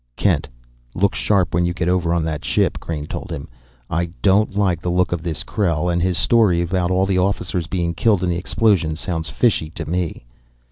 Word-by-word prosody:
"Kent, - - +1 0.5
look 100 +2 +2
sharp 95 -4 +1
when 85 +1 +2
you 85 0 -1
get 85 -1 -1
over 90 -2 +1
on 85 -1 +1
that 80 -2 -3
ship," - - +1
Crain 75 -3 -5
told - - -6
him. 70 - -5 0.4
"I 85 +1 -1 0.2
don't 100 +1 +3
like 90 -5 +1
the 90 - -2
look 90 +1 +1
of 85 -2 -1
this 80 -2 -3
Krell, 90 -4 0
and 85 - 0
his 90 0 +1
story 100 -1 +3
about 90 +1 0
all 95 +1 +2
the 95 -1 +1
officers 90 -2 -1
being 85 -2 -1
killed 100 0 +2
in 90 - +1
the - - 0
explosion 85 -3 +1
sounds 80 -2 -3
fishy 80 - +1
to 80 -1 -7
me." 85 -6 -3
90 Hz, 205 wpm, -20 LUFS, 85-95 Hz, 0.5 s, don't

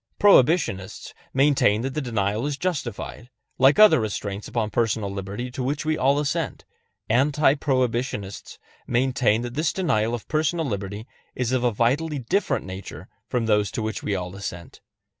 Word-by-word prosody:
Prohibitionists 135 - +3 0.2
maintain 135 -6 +3
that 135 0 -3
the 150 - -2
denial 110 -1 -1
is 145 -2 -3
justified, 150 -7 -4 0.3
like 135 +3 +5
other 215 -7 +7
restraints 105 -2 -4
upon 110 -3 -2
personal 110 -4 0
liberty 100 +6 -5
to 130 - -5
which 140 +4 -2
we 155 0 +1
all 140 0 +2
assent; 145 -1 -2 0.4
anti 140 +4 +3
prohibitionists 125 -7 -2 0.3
maintain 125 -2 +1
that 120 0 -5
this 155 +4 0
denial 120 - 0
of 115 - -9
personal 160 +1 0
liberty 100 -2 -4 0.3
is 125 -1 -1
of 130 -1 +1
a 120 - +3
vitally 140 +8 0
different 140 - -1
nature 95 +1 -8 0.2
from 120 -2 -1
those 105 -2 +2
to 110 - -4
which 110 -2 -3
we 100 - -1
all 90 0 -5
assent. 85 -4 -8
120 Hz, 160 wpm, -24 LUFS, 105-140 Hz, 0.4 s, other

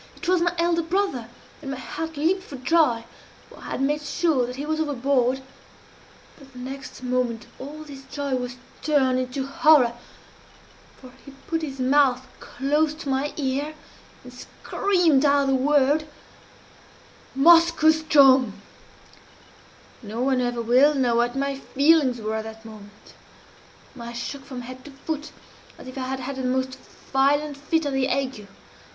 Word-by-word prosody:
It - - -8
was 365 -1 +3
my 345 0 +2
elder 335 0 +2
brother, 330 - -1 0.3
and 280 - -7
my 270 - -4
heart 320 +5 -6
leaped 345 +6 +1
for 290 - -10
joy, 260 -3 +2 0.4
for - - -16
I - - -13
had - - -3
made 295 +2 0
sure 295 -4 0
that 250 - -6
he 280 +2 -5
was 315 +1 -2
overboard 265 -3 0 1.0
but 275 -1 -16
the - - -13
next 265 +1 -8
moment 250 -2 -1
all 295 +4 -8
this 280 -3 -11
joy 285 -2 -4
was 250 -1 -3 0.3
turned 265 -4 +2
into 255 +1 -3
horror 275 -3 +4 1.1
for 255 -1 -13
he 280 - -13
put 325 -1 -2
his 275 -4 -6
mouth 260 -1 +3
close 295 +4 -1
to 310 -3 -7
my 270 +2 0
ear, 285 +2 -2 0.5
and - - -12
screamed 350 -8 +1
out 285 -1 +3
the 270 - +1
word 290 +3 +2 1.3
'Moskoe 330 +1 +6
ström!' 275 -7 +5 1.5
"No 220 0 -7
one 260 0 +1
will 250 - +1 0.4
ever 300 -2 0
know 245 -2 +2
what 240 +1 +1
my 275 0 -2
feelings 280 -3 +3
were 215 0 -3
at 220 - -5
that 220 0 -10
moment. 205 -2 -14 0.9
I 235 0 -7
shook 270 +3 -6
from 255 -3 -7
head 255 +1 -10
to - - -9
foot 300 +2 -6 0.5
as - - -12
if 255 - -9
I 260 -1 -4
had 265 0 -4
had 265 +1 -5
the 260 - -4
most 260 +1 -1 0.4
violent 285 +2 +2
fit 300 +3 -1
of 285 - -2
the 265 -1 +1
ague. 260 -6 -2
275 Hz, 160 wpm, -24 LUFS, 255-300 Hz, 1.5 s, Moskoe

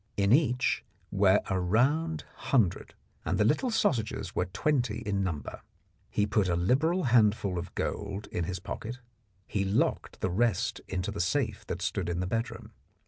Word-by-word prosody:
In 100 +2 +4
each 125 -4 +2 0.3
were 100 0 +4
a 95 -1 0
round 145 - +1 0.3
hundred, 115 -10 +2 0.3
and 95 - 0
the 105 - +3
little 155 - +2
sausages 130 - 0
were 90 - 0
twenty 120 - 0
in 100 -1 0
number. 80 -7 -4 0.5
He 105 - +1
put 105 -2 +1
a 85 - +2
liberal 145 - +2
handful 105 - +3
of 90 +1 -8
gold 100 0 -3
in 85 - -1
his 95 +2 -3
pocket; 110 +7 -6 0.5
he 100 - -1
locked 100 +2 0
the 95 - -1
rest 110 0 +1
into 95 +2 -2
the 100 - -2
safe 110 +2 -1
that - - -3
stood 90 -3 -1
in 85 0 -1
the 90 - 0
bedroom. 115 +5 -3
105 Hz, 165 wpm, -29 LUFS, 95-125 Hz, 0.5 s, In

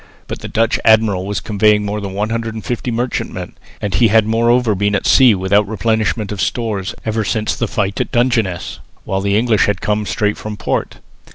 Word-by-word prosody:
But - - -6
the - - -7
Dutch 115 +1 +1
admiral 110 -4 +3
was 100 -2 -2
convoying 105 0 +2
more 105 +1 -3
than 100 -1 -5
150 115 +3 -3
merchantmen 120 +2 -3 0.3
and 100 -2 -3
he 120 - +4
had 110 0 +4
moreover 115 +1 +2
been 100 +1 0
at - - -2
sea 125 -5 +6
without 100 +2 +2
replenishment 110 -1 -1
of 100 -3 -4
stores 105 -1 -2
ever 110 0 -1
since 105 +1 -1
the - - -2
fight 100 -3 -1
at - - -4
Dungeness, 120 -7 0 0.3
while 95 0 -1
the 100 +1 +1
English 110 -2 +2
had 100 -2 0
come 105 0 -1
straight 105 +3 0
from 105 -1 -6
port. - - -2
105 Hz, 185 wpm, -17 LUFS, 100-115 Hz, 0.3 s, sea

